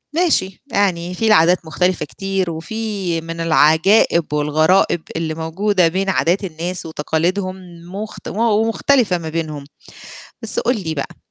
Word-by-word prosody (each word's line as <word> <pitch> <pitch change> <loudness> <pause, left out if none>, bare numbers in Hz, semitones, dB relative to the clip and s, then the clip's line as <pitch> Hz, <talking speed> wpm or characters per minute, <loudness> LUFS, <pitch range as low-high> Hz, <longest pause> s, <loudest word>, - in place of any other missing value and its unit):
ماشي 300 - +1
يعني 180 -3 0
في 225 +5 -1
العادات 175 -3 +4
مختلفة 180 +2 0
كتير، 195 0 -3
وفي 190 -1 -3
من 165 0 -7
العجائب 165 +1 +3
والغرائب 155 +4 +2
اللي 160 -1 -2
موجودة 180 +3 +1
بين 190 +3 -1
عادات 185 +1 +1
الناس 175 0 -4
وتقاليدهم، 175 +5 -1 0.4
مخت 210 +3 -7
ومختلفة 225 0 +2
ما 160 -1 -6
بينهم، 155 -3 -4 0.8
بس - - -2
قُل 260 - +1
لي 160 -2 -2
بقى 140 - -5
180 Hz, 125 wpm, -19 LUFS, 160-200 Hz, 0.8 s, العادات